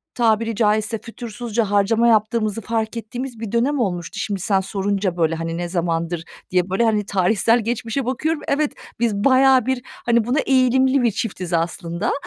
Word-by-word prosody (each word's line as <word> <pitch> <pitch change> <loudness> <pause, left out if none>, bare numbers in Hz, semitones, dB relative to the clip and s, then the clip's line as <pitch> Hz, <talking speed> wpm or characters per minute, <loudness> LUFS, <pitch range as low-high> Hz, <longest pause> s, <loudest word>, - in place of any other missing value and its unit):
tabiri 230 -1 +1
caizse, 215 0 +1
fütursuzca 230 -2 -4
harcama 220 +3 +3
yaptığımızı 215 -1 +1
fark 225 +1 -2
ettiğimiz 240 +1 -6
bir 225 -3 -5
dönem 265 +5 +1
olmuştu. 175 -6 -2
Şimdi 200 -3 -2
sen 195 0 +1
sorunca 195 -1 -2
böyle, 165 -1 +1
hani, 165 0 -4
ne 175 0 -3
zamandır 170 -1 -2 0.3
diye 180 0 +1
böyle, 195 +5 +2
hani, 210 -2 +1
tarihsel 205 +5 +2
geçmişe 240 +3 -2
bakıyorum, 295 +6 -1
evet, 290 +1 +1 0.3
biz 235 -3 +2
bayağı 260 -2 +5
bir, 260 -1 -1
hani, 235 -1 0
buna 245 +6 0
eğilimli 260 0 +3
bir 235 - +3
çiftiz, 190 -4 -4
aslında. 170 0 -1
220 Hz, 160 wpm, -21 LUFS, 190-240 Hz, 0.3 s, bayağı